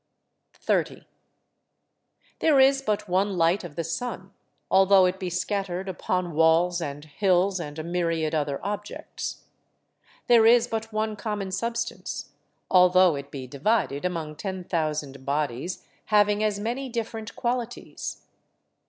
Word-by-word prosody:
30. - - -1 1.3
There 300 -4 +4
is 270 +1 +5
but 210 -4 -1
one 190 +1 +1
light 170 +4 +2
of 165 -4 -9
the 165 - -2
sun, 190 +3 -4 0.4
although 190 0 +6
it 180 +1 -1
be 185 - -3
scattered 190 0 -2
upon 180 -1 -2
walls 165 +3 +3
and 145 -1 -5
hills, 185 +3 +1
and 150 -3 -6
a 155 - -4
myriad 165 -2 -1
other 145 -3 -1
objects. 205 0 -5 0.8
There 230 -2 +6
is 240 0 +6
but 225 -1 -4
one 215 0 -1
common 210 -3 -4
substance, 235 +4 -3 0.4
although 180 -2 +6
it 140 0 -7
be 135 -2 -7
divided 145 - 0
among 165 -4 -3
ten 190 +1 -4
thousand 150 -6 -2
bodies 145 +3 -2 0.2
having 210 0 +3
as 210 -2 0
many 245 +5 -3
different 225 -2 -5
qualities. 245 -1 -4
185 Hz, 130 wpm, -26 LUFS, 165-215 Hz, 1.3 s, although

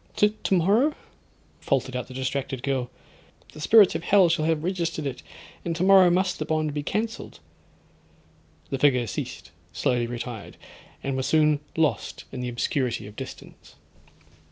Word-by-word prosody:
'—'Tomorrow?' 210 - +2 0.6
faltered 130 -2 -1
out 125 - -3
the 130 - -10
distracted 130 -1 -3
girl; 130 -3 -1 0.6
'the 150 - -10
spirits 210 +4 +6
of - - -3
hell 190 -2 +5
shall 165 -2 +1
have 160 -1 0
registered 170 -4 -2
it, 135 -3 -4 0.4
and 170 -1 -2
tomorrow 185 +1 +6
must 185 +1 +1
the - - -2
bond 155 -1 -1
be 145 - -2
cancelled.' 220 - -4 1.3
The 135 - -2
figure 130 -4 +3
ceased—slowly 120 +2 -3
retired, 120 -2 -7 0.5
and 135 -1 -2
was 130 0 -1
soon 155 -2 +3 0.2
lost 160 -2 0
in 125 - -5
the 125 - -3
obscurity 120 -1 -1
of 105 +1 -11
distance. 135 +2 -10
150 Hz, 140 wpm, -25 LUFS, 130-180 Hz, 1.3 s, spirits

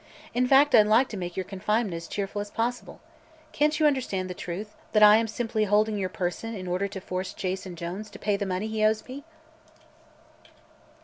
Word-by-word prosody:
In 250 +1 +2
fact, 275 +3 +5
I'd 210 -2 +7
like 230 +5 +4
to - - -6
make 175 -2 -5
your 190 - 0
confinement 205 +2 -1
as 165 0 -6
cheerful 200 0 -3
as 205 - -6
possible. 240 +3 -3 0.5
Can't 300 +1 +1
you 310 - +3
understand 205 -10 0
the - - -3
truth 185 +5 -6 0.2
that 215 -1 +5
I 210 +1 +9
am 225 0 0
simply 220 -1 -1
holding 210 +1 +2
your 190 -2 -2
person 185 +6 -3
in 185 -2 -6
order 180 +3 -1
to 195 -1 -7
force 185 0 -4
Jason 185 -1 -4
Jones 180 +6 -6
to - - -11
pay 205 -1 0
the 200 0 -3
money 185 +2 -2
he 220 0 -2
owes 215 0 +2
me?" 270 +3 -8
210 Hz, 200 wpm, -26 LUFS, 185-225 Hz, 0.5 s, I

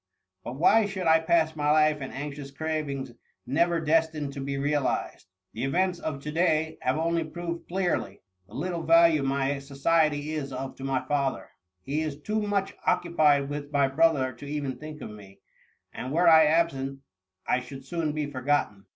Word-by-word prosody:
But 120 - -6
why 205 +7 +4
should 190 -2 -4
I 160 0 +5
pass 160 -1 +2
my 150 -1 0
life 155 -1 +3
in 135 - -5
anxious 140 0 -6
cravings 140 -3 -3 0.3
never 170 +5 +1
des 160 +1 +3
tined 145 -3 -5
to 140 - -6
be 140 0 -3
realized? 145 -7 -1 0.3
The 115 - -4
events 180 +6 0
of 140 -4 -5
to 150 - -4
day 160 -1 +1
have 130 +3 0
only 165 +1 0
proved 170 +1 -6
clearly 175 - -2 0.2
the - - -14
little 170 +3 -3
value 165 -1 +5
my 135 +1 0
society 145 +2 +1
is 145 -3 -4
of 130 +1 -5
to 135 - -9
niy 135 -1 -1
father: 140 -2 -1 0.3
he 145 +7 -2
is 150 -2 -4
too 215 +7 -2
much 200 -2 -1
occu 170 -1 +1
pied 145 -3 +4
with 145 0 -6
my 140 -2 +3
brother 135 -2 +2
to 120 +4 -11
even 145 -3 -3
think 155 0 -9
of - - -7
me, 100 -2 -14 0.5
and 130 - -5
were 170 +4 +3
I 160 -1 +8
absent, 135 -4 0 0.5
I 125 - +2
should 135 +1 -10
soon 160 +1 -2
be 150 0 -2
forgotten. 130 -8 -1
150 Hz, 185 wpm, -27 LUFS, 135-165 Hz, 0.5 s, I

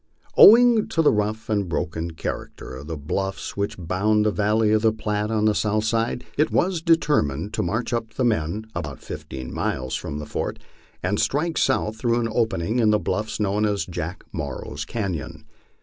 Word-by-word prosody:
Owing 235 0 +8
to 165 - +1
the - - +6
rough 105 +2 -1
and 100 -4 0
broken 80 +1 -2
character 75 - -6
of 70 +3 -9
the 80 -1 -4
bluffs 95 +7 -3
which 100 0 -2
bound 100 +5 +1
the 105 - +3
valley 105 +1 +2
of 110 0 +3
the 110 0 +4
Platte 105 -1 -2
on 110 -1 +1
the 110 - +4
south 105 +1 0
side, 115 +2 0
it 150 - +4
was 180 -2 +1
determined 105 - +1
to - - 0
march 115 +7 -2
up 115 -2 -3
the 130 - +1
men 105 -1 0
about - - -5
fifteen 65 -2 -7
miles 65 0 -2
from 75 - -4
the 75 - -5
fort - - -3 0.5
and 95 +3 0
strike 160 +4 0
south 110 -5 +1
through 120 +1 +1
an 115 -1 -1
opening 110 -1 0
in 110 -2 +4
the 105 - +4
bluffs 110 +1 -2
known 105 0 +1
as 105 -2 0
Jack 90 +1 -5
Morrow's 70 -5 -5
canon. 80 -8 -4
105 Hz, 185 wpm, -23 LUFS, 90-115 Hz, 0.5 s, Owing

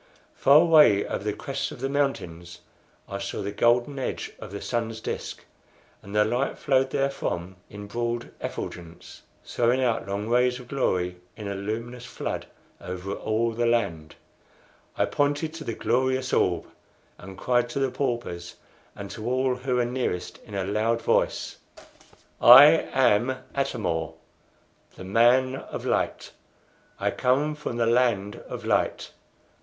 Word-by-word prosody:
Far 140 +2 +6
away 155 -12 +6
over - - -4
the 105 - -1
crests 135 +6 -4
of - - -10
the 135 - -1
mountains 90 - -3 0.5
I 100 - -5
saw 100 0 -4
the 100 - -3
golden 120 +6 +2
edge 130 - -4
of - - -9
the 100 - -5
sun's 115 -1 -3
disc, - - -6 0.6
and 100 +1 -9
the 105 0 +4
light 120 +5 -1
flowed 135 -1 +2
therefrom 95 -11 -2
in 105 0 -9
broad 120 +2 -3
effulgence, 85 0 -7 0.2
throwing 120 +2 +1
out 115 -5 0
long 100 +2 -3
rays 125 +1 +2
of 125 - -12
glory 90 -9 0 0.2
in 105 -2 -6
a 100 - -2
luminous 115 +5 -5
flood - - -5 0.3
over 90 +2 -5
all 110 +3 -1
the 120 +1 0
land. 85 -10 -1 0.8
I - - +3
pointed 145 +2 0
to 165 -1 -7
the 115 -6 -4
glorious 130 +3 0
orb, 90 -2 +2 0.5
and 95 +1 -10
cried 120 -1 +1
to 130 - -3
the 135 -2 0
paupers, 120 -10 -3 0.4
and 100 -1 -8
to 110 +1 -6
all 130 0 +1
who 125 0 -2
were 125 -1 +2
nearest, 120 -8 -3
in 105 - -10
a 95 - -1
loud 110 +4 0
voice: - - 0 0.8
"I 125 +3 +11 0.3
am 130 0 +3 0.2
Atam 130 -5 -2
or, 80 -1 -2 0.8
the - - -10
Man 120 +6 +3
of - - -7
Light! - - -1 0.7
I - - 0
come 140 +4 +1
from 150 -5 -5
the 115 - +2
land 115 -4 +1
of - - -6
light! - - 0
120 Hz, 150 wpm, -26 LUFS, 100-130 Hz, 0.8 s, I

